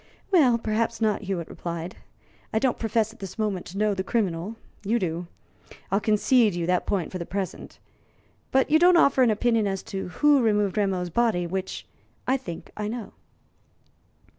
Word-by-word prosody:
"Well, 270 Hz, -11 st, +5 dB
perhaps 230 Hz, +1 st, -1 dB
not," 220 Hz, -2 st, +1 dB
Hewitt 190 Hz, -5 st, -3 dB
replied. 170 Hz, +1 st, -6 dB, 0.6 s
"I -, -, 0 dB
don't 250 Hz, +2 st, +1 dB
profess 225 Hz, -1 st, 0 dB
at -, -, -20 dB
this 195 Hz, +1 st, -8 dB
moment 210 Hz, -5 st, -2 dB
to 190 Hz, -, -8 dB
know 210 Hz, 0 st, +2 dB
the 190 Hz, -1 st, -2 dB
criminal; 195 Hz, -2 st, -1 dB, 0.3 s
you 220 Hz, +4 st, +1 dB
do. 175 Hz, -4 st, -3 dB, 0.6 s
I'll 195 Hz, -, +3 dB
concede 215 Hz, 0 st, +3 dB
you 170 Hz, -1 st, -1 dB
that 180 Hz, +1 st, 0 dB
point 190 Hz, -5 st, -1 dB
for 185 Hz, -, -5 dB
the 170 Hz, -, -4 dB
present. 195 Hz, -1 st, -5 dB, 0.7 s
But 265 Hz, +2 st, +2 dB
you 315 Hz, -, +6 dB
don't 355 Hz, +1 st, +6 dB
offer 280 Hz, -5 st, +4 dB
an 250 Hz, -, +5 dB
opinion 220 Hz, 0 st, +2 dB
as 195 Hz, -1 st, -3 dB
to 190 Hz, -1 st, -3 dB
who 290 Hz, +8 st, +3 dB
removed 210 Hz, -4 st, +2 dB
Rameau's 190 Hz, -4 st, 0 dB
body 220 Hz, -5 st, +1 dB
which 190 Hz, +2 st, -4 dB, 0.4 s
I 260 Hz, -, +2 dB
think 250 Hz, -11 st, -7 dB
I 210 Hz, -1 st, -3 dB
know." 230 Hz, 0 st, -6 dB
210 Hz, 175 wpm, -25 LUFS, 185-235 Hz, 0.7 s, you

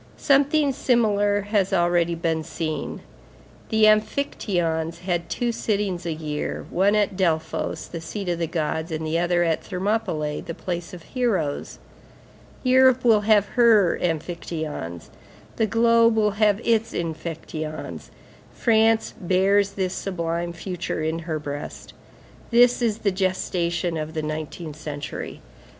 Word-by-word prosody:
Something 285 Hz, +1 st, +3 dB
similar 205 Hz, -6 st, +2 dB
has 205 Hz, -1 st, 0 dB
already 175 Hz, -2 st, +2 dB
been 165 Hz, -1 st, -1 dB
seen. 155 Hz, 0 st, -4 dB, 0.7 s
The 220 Hz, -1 st, +2 dB
amphictyons 175 Hz, -, +1 dB
had 175 Hz, -2 st, -2 dB
two 240 Hz, -1 st, -1 dB
sittings 200 Hz, -6 st, -2 dB
a -, -, -1 dB
year, 155 Hz, -1 st, -4 dB
one 195 Hz, +4 st, +3 dB
at 205 Hz, -2 st, +1 dB
Delphos 165 Hz, -4 st, -1 dB
the 170 Hz, -, -7 dB
seat 195 Hz, +4 st, -5 dB
of 170 Hz, -1 st, -1 dB
the 165 Hz, -, 0 dB
gods, 160 Hz, 0 st, -2 dB
the 160 Hz, 0 st, -1 dB
other 175 Hz, 0 st, +2 dB
at 165 Hz, -2 st, +1 dB
Thermopylæ, 185 Hz, -6 st, -2 dB
the 165 Hz, -, -4 dB
place 175 Hz, 0 st, -5 dB
of 170 Hz, -, -12 dB
heroes. 195 Hz, -, -1 dB, 0.9 s
Europe 260 Hz, -1 st, +5 dB
will 220 Hz, -3 st, +5 dB
have 205 Hz, -1 st, +3 dB
her 225 Hz, -7 st, +5 dB
amphictyons; 160 Hz, -, -4 dB, 0.5 s
the 220 Hz, -, +2 dB
globe 230 Hz, +1 st, +4 dB
will 210 Hz, -1 st, +3 dB
have 210 Hz, 0 st, +2 dB
its 225 Hz, -1 st, +2 dB
amphictyons. 160 Hz, -1 st, -5 dB, 0.4 s
France 225 Hz, -1 st, +2 dB
bears 195 Hz, +2 st, +2 dB
this 190 Hz, -2 st, -2 dB
sublime 170 Hz, -3 st, -3 dB
future 170 Hz, -2 st, -4 dB
in 160 Hz, +1 st, -1 dB
her 160 Hz, -1 st, -3 dB
breast. 145 Hz, -1 st, -7 dB, 0.6 s
This 245 Hz, +1 st, +5 dB
is 225 Hz, -3 st, +1 dB
the 205 Hz, -3 st, 0 dB
gestation 175 Hz, -3 st, -1 dB
of 155 Hz, +1 st, -5 dB
the 155 Hz, -, -2 dB
nineteenth 155 Hz, 0 st, -5 dB
century. 145 Hz, -2 st, -6 dB
180 Hz, 130 wpm, -24 LUFS, 160-215 Hz, 0.9 s, Europe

